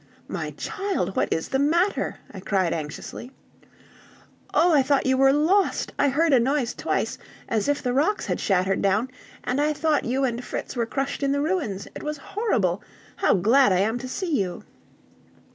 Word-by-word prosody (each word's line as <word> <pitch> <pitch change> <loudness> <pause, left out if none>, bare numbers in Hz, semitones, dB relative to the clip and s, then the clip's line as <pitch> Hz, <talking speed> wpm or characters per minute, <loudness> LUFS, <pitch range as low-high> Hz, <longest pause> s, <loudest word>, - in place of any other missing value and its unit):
"My - - -4
child, 390 - -2
what - - 0
is 160 - -1
the 270 - 0
matter?" 340 +7 +1 0.2
I 195 - -8
cried 185 -2 0
anxiously. 160 - -6 1.2
"Oh, 345 0 +4
I 290 - +6
thought 275 +1 +1
you 260 0 +3
were 270 +1 +5
lost! 330 +8 +2
I 285 - +4
heard 310 +3 +2
a 255 - +6
noise 260 0 0
twice, - - -2 0.3
as 215 -3 0
if 290 - 0
the 250 -1 0
rocks 315 +11 +1
had - - -2
shattered 190 -1 +1
down; 210 +6 +1 0.3
and 260 +3 0
I 300 +1 +2
thought 310 0 +1
you 260 +3 0
and 245 -1 -1
Fritz - - -5
were 235 -2 -1
crushed 275 +4 -3
in 275 0 +1
the 285 - 0
ruins! 290 - -2
It - - -6
was 300 0 -4
horrible! 230 - -1 0.4
How - - +3
glad 230 +6 +4
I 185 0 +3
am 220 +4 0
to 255 - -6
see 330 -1 -1
you!" 180 -3 -3
265 Hz, 185 wpm, -24 LUFS, 210-300 Hz, 1.2 s, I